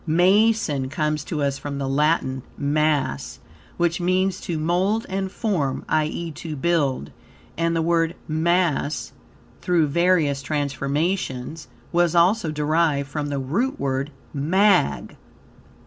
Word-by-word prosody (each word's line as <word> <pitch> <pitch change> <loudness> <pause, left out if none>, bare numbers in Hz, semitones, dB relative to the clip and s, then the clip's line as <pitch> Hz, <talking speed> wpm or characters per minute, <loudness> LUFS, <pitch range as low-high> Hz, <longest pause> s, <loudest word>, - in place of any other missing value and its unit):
Mason 180 -4 +3
comes 150 +1 -1
to 150 -4 -2
us 140 -1 -1
from 145 -1 -5
the 135 -1 -2
Latin 135 -2 +1 0.2
"mass," 145 -2 0 0.4
which 170 +1 +1
means 185 +1 +1
to 170 - -3
mould 180 +8 +1
and 190 0 -3
form, 175 - -1
i.e., 155 +2 -1
to 155 +1 -6
build; 140 - 0 0.4
and 165 0 0
the 165 - +1
word 165 0 +1
"mass," 160 -2 0 0.5
through 175 -3 +2
various 155 -2 +2
transformations, 145 0 -2 0.2
was 175 -1 +2
also 180 +2 +3
derived 150 -1 +1
from 150 -1 -2
the 140 - -2
root 165 - -1
word 135 +1 -1 0.2
"mag." 155 - +2
155 Hz, 120 wpm, -23 LUFS, 140-175 Hz, 0.5 s, Mason